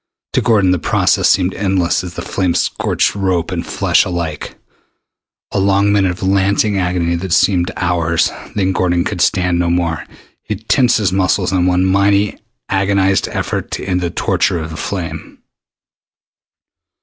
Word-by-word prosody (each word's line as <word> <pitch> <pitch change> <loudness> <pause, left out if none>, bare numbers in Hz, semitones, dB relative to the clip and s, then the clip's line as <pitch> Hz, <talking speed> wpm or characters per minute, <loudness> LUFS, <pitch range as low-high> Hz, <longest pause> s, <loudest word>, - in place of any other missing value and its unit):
To - - +2
Gordon 105 -6 +3
the 90 - +1
process - - +2
seemed 90 0 +2
endless 95 -3 0
as 90 -2 -8
the - - -5
flame 90 -3 -1
scorched - - 0
rope 95 -4 -1
and - - -3
flesh - - +1
alike. 85 -4 -4 1.0
A - - 0
long 100 +1 +2
minute 100 -2 +2
of 90 +2 -5
lancing 100 +1 +1
agony 90 -2 0
that 90 +1 -5
seemed 90 -1 +2
hours 85 -2 +1 0.2
then 95 -2 +1
Gordon 90 -2 +1
could 95 -2 -3
stand 90 -1 +1
no 85 -1 +1
more. 85 -2 -1 0.4
He 105 - -4
tensed 120 +4 +2
his 100 -5 0
muscles 95 0 +1
in 90 -1 +1
one 90 0 +2
mighty 100 +1 +2 0.3
agonized 95 -1 +1
effort - - -3
to - - -4
end 90 -1 -1
the 85 - -1
torture 85 - 0
of 80 -1 -5
the - - -7
flame. 90 -1 -5
95 Hz, 160 wpm, -16 LUFS, 85-100 Hz, 1.0 s, Gordon